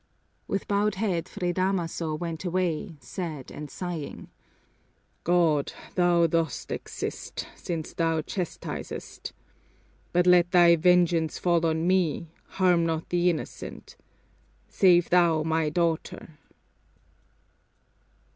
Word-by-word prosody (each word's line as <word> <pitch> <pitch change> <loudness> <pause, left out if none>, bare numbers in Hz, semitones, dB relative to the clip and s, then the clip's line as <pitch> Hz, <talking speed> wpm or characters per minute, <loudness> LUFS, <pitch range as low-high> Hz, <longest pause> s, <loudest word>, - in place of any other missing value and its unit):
With 195 - -2
bowed 205 0 +1
head 185 -5 -1
Fray 175 -1 -2
Damaso 175 -4 -1
went 165 +1 -5
away, 175 -2 -1
sad 150 0 -6
and 150 0 -7
sighing. 175 -5 -6 0.9
"God, 165 -5 +2 0.2
Thou 175 -2 +4
dost 165 -1 -1
exist, - - -5
since 165 -3 -5
Thou 165 -2 0
chastisest! 180 +1 -6 0.8
But 175 0 +3
let 180 -1 +5
Thy 175 -2 +6
vengeance 170 -2 +3
fall 170 -2 +2
on 160 +1 0
me, 170 -3 +1 0.3
harm 180 -3 +4
not 165 -1 -2
the 175 0 +2
innocent. 165 - -6 0.7
Save 175 -3 +4
Thou 170 -3 +4
my 160 -1 +1
daughter!" 160 -2 -2
170 Hz, 105 wpm, -27 LUFS, 160-180 Hz, 0.9 s, Thy